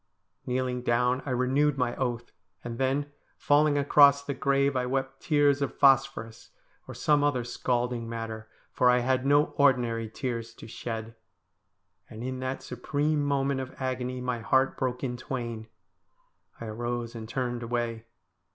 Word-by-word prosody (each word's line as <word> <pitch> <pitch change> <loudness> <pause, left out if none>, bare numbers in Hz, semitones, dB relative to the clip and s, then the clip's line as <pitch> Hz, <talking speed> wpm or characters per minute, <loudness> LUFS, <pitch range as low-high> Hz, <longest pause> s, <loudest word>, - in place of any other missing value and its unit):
Kneeling 125 0 -1
down, 125 +1 +1
I - - -2
renewed 135 +3 +1
my 125 -2 0
oath, 120 -2 -3 0.3
and 120 0 -6
then, 140 +2 0 0.3
falling 145 0 +3
across 140 0 +6
the 140 - -3
grave, 140 0 +1
I 125 -1 0
wept 135 +1 -2
tears 145 -2 +3
of 140 - -2
phosphorus, 135 -4 +2 0.4
or - - -8
some 145 -1 +2
other 135 -4 +1
scalding 120 -1 -2
matter, 110 -1 -6 0.2
for 125 - +3
I 125 0 +4
had 130 +1 +1
no 145 +2 +3
ordinary 120 -5 +2
tears 115 -1 -4
to - - -11
shed. 115 0 -6 1.0
And 110 +2 -8
in 130 0 -4
that 130 +1 -4
supreme 145 +4 -1
moment 140 -1 0
of 130 0 -7
agony 130 -1 -3
my 125 -1 -2
heart 130 +4 +2
broke 125 0 -2
in 125 -2 -2
twain. 120 -3 -5 0.9
I 115 - -6
arose 120 +1 -4
and 110 -2 -8
turned 120 -1 -2
away. 115 -1 -3
125 Hz, 150 wpm, -28 LUFS, 120-135 Hz, 1.0 s, across